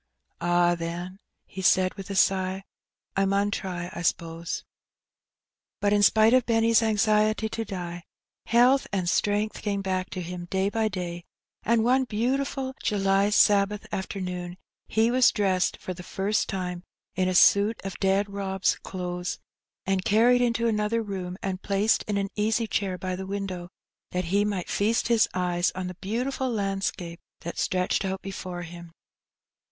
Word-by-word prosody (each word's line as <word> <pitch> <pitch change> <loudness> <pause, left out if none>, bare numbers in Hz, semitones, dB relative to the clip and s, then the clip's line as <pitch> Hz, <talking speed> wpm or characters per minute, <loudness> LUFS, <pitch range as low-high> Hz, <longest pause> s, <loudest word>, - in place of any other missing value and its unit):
" - - -46
Ah, 175 0 +3
then," 175 +3 -5 0.3
he 190 - -8
said, 185 0 +3
with 195 0 -9
a 200 - -3
sigh, 190 0 +2 0.3
" - - -59
I 195 - +2
mun 200 +1 +1
try, 180 -3 -4
I - - -5
s'pose." 165 -1 -2 1.2
But 205 0 +2
in 205 - +3
spite 220 +2 +5
of 255 -2 +4
Benny's 230 0 +4
anxiety 215 0 +2
to 225 - -3
die, 175 -4 -6 0.4
health 245 +4 +4
and 190 -3 -1
strength 210 +4 0
came 200 -2 -2
back 185 -1 -2
to 185 - -5
him 175 0 -6
day 190 +2 0
by 220 +1 0
day, 175 -3 -5 0.4
and 230 0 +2
one 260 +2 +3
beautiful 260 +4 -1
July 195 0 +2
Sabbath 205 0 +3
afternoon 180 -2 -4 0.3
he 225 +2 +2
was 255 -1 +5
dressed, 190 -3 +1
for 185 - -6
the 180 - -10
first 195 +4 -1
time, 180 -2 -3 0.3
in 185 +1 0
a 185 - 0
suit 205 +4 +5
of 195 -1 -6
dead 195 +1 +2
Rob's 195 -2 -1
clothes, 180 -1 -4 0.5
and 190 -1 0
carried 240 +5 +4
into 235 -1 +1
another 220 +1 0
room, 185 -3 -5
and 190 -1 -3
placed 200 +2 +2
in 205 -1 0
an 195 0 -1
easy 220 +2 +1
chair 195 -3 -1
by 185 +1 -3
the 190 +1 -6
window, 190 -3 -4 0.4
that 180 0 -2
he 205 +1 +3
might 200 -4 -2
feast 225 +3 +1
his 230 -2 +4
eyes 180 -1 +1
on 185 0 -3
the 180 - -5
beautiful 255 +6 -2
landscape 195 -5 -2 0.2
that 170 - -6
stretched 180 +1 0
out 190 0 -3
before 185 -2 -6
him. 170 0 -10
195 Hz, 165 wpm, -26 LUFS, 180-215 Hz, 1.2 s, spite